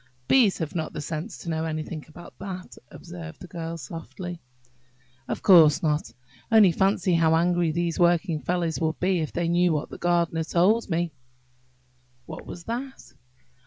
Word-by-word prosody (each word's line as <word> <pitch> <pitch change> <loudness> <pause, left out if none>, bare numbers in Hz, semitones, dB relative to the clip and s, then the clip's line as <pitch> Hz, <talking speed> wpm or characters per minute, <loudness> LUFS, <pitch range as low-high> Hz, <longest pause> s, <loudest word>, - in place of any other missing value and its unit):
"Bees 235 -8 +4
have 160 -1 -4
not 160 -3 -3
the - - -5
sense 160 +7 -5
to 170 - -7
know 160 0 -1
anything 155 0 -4
about 170 +2 -13
that," 185 -2 -7
observed 170 -2 -10
the - - -12
little 175 -1 -9
Girl, 165 0 -4
softly. 165 +3 -7 0.9
"Of - - -4
course 165 -6 +7
not! 150 -5 0 0.4
Only 215 -5 +7
fancy 190 +1 +1
how 165 -1 +4
angry 175 0 +2
these 170 +1 -2
working 170 -1 +2
fellows 170 +3 -1
would 160 0 -1
be, 185 -1 +1
if 155 - -3
they 170 0 -1
knew 175 0 +3
what 150 0 -3
the - - -8
gardener 170 -2 +1
told 190 +8 +2
me!" 170 0 0 1.1
"What 155 - -9
was 170 - -8
that?" 255 +6 -6
170 Hz, 165 wpm, -25 LUFS, 160-180 Hz, 1.1 s, course